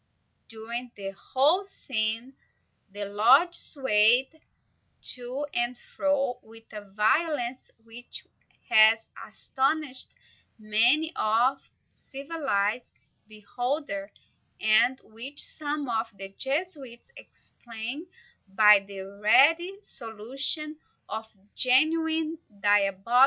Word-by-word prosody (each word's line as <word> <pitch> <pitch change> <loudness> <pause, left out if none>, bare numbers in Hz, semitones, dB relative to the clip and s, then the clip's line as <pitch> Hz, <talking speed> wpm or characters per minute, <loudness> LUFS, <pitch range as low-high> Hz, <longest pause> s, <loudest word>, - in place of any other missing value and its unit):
During 235 +2 -7
the 195 -1 -6
whole 280 - +1
scene, 235 - -4 0.6
the 205 +1 -5
lodge 245 - +4
swayed 265 +1 +2 0.7
to 250 +3 -5
and 240 +1 -1
fro 275 -2 -2
with 225 0 -15
a 210 - -6
violence 240 +6 -1
which 230 +2 -9 0.4
has 220 +1 +5 0.2
astonished 270 0 -1 0.4
many 235 +10 +2
a 235 +5 +2 0.4
civilized 270 -7 -3 0.3
beholder, 215 0 -4 0.5
and 220 +4 +3
which 245 +6 -9
some 295 -2 -3
of 225 -1 -2
the 195 0 -8
Jesuits 275 - -4
explain 240 +8 -9 0.4
by 210 +1 +6
the 195 0 -10
ready 275 - +3
solution 270 - 0 0.3
of 220 +1 -5
a 195 0 -31
genuine 315 +4 +2 0.2
diabolic 205 0 +3
intervention. 235 +6 0
245 Hz, 95 wpm, -27 LUFS, 215-285 Hz, 0.7 s, by